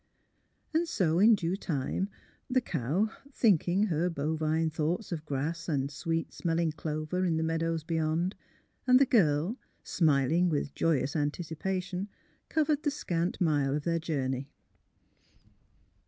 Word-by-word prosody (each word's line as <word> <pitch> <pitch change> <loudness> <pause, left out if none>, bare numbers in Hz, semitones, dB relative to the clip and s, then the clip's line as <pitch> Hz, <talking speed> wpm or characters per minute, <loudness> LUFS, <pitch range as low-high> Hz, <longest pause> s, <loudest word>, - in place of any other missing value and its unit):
And 335 +2 +2
so 175 - +1
in 220 +3 +7
due 175 -1 -1
time 180 +1 -2 0.4
the 255 0 +3
cow, 180 - -1 0.2
tliinking 195 -2 +3
her 170 +2 +1
bovine 160 +1 0
thoughts 160 +7 -2
of 160 -3 -3
grass 160 +5 -2
and 140 -2 0
sweet 165 +2 -2
smelling 165 -1 0
clover 155 +3 -3
in 170 -3 +1
the 160 - 0
meadows 165 0 -1
beyond, 160 +3 0 0.5
and 255 0 +7
the 275 - +6
girl, 180 - +2 0.2
smiling 160 +2 +2
with 145 -3 -1
joyous 145 -3 +1
anticipation, 180 +5 -2 0.4
covered 305 -2 +1
the 295 - +1
scant 175 - -2
mile 145 -6 +2
of 150 - -2
their 165 0 0
journey. 135 -4 -2
165 Hz, 130 wpm, -30 LUFS, 150-185 Hz, 0.5 s, in